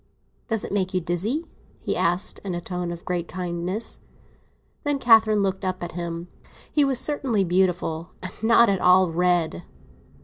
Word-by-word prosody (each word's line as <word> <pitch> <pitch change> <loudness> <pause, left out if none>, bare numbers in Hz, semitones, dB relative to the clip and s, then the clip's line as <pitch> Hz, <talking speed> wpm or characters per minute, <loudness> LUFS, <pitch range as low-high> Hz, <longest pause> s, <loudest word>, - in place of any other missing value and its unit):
"Does 225 -3 -1
it - - -7
make 190 -2 -1
you - - +3
dizzy?" 185 - -2 0.3
he - - -2
asked, 175 +3 +1
in 190 -3 -3
a - - -2
tone 180 0 -4
of 170 0 -8
great 175 -2 -2
kindness. 180 +4 -3 0.8
Then 290 -1 0
Catherine 220 -4 +5
looked 190 0 -2
up 185 -1 -2
at 175 - -5
him; 170 0 -5 0.4
he 295 - +3
was 270 -2 +1
certainly 260 -9 0
beautiful, 175 -2 0
and 185 - -6
not 235 +1 +6
at 195 -3 +1
all 180 -1 +5
red. 175 - +1
185 Hz, 165 wpm, -24 LUFS, 175-215 Hz, 0.8 s, not